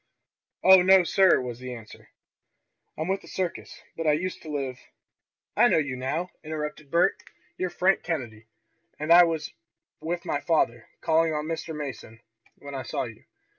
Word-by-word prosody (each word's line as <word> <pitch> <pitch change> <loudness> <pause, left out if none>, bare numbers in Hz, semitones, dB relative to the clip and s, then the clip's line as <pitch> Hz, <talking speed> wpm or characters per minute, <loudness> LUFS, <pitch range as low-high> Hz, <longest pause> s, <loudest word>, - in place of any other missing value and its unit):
"Oh, 190 -1 +8
no, 190 0 +6
sir," 190 +1 +4
was 125 -2 -6
the 125 -1 -6
answer. 110 -2 -13 0.9
"I'm 155 - -3
with 195 +1 -1
the - - -16
circus. 185 -2 -5
But 165 -1 -3
I 150 - +5
used 185 +5 -3
to 155 - -10
live 135 -4 -3 0.4
" - - -64
"I - - +6
know - - +3
you 145 -4 -1
now!" 155 +8 -3
interrupted 150 -1 -5
Bert. 170 +5 +2 0.3
"You're 185 - -2
Frank 185 +3 +2
Kennedy, 115 -10 -5 0.5
and 155 +3 +3
I 175 0 +9
was 160 -2 -3 0.5
with 170 +2 -4
my 145 - -1
father, 145 -8 0
calling 160 0 +2
on 150 0 -2
Mr. 160 0 -4
Mason, 130 -6 -7 0.4
when 140 0 -10
I 135 - -4
saw - - -3
you. 110 -3 -10
155 Hz, 170 wpm, -26 LUFS, 130-170 Hz, 0.9 s, I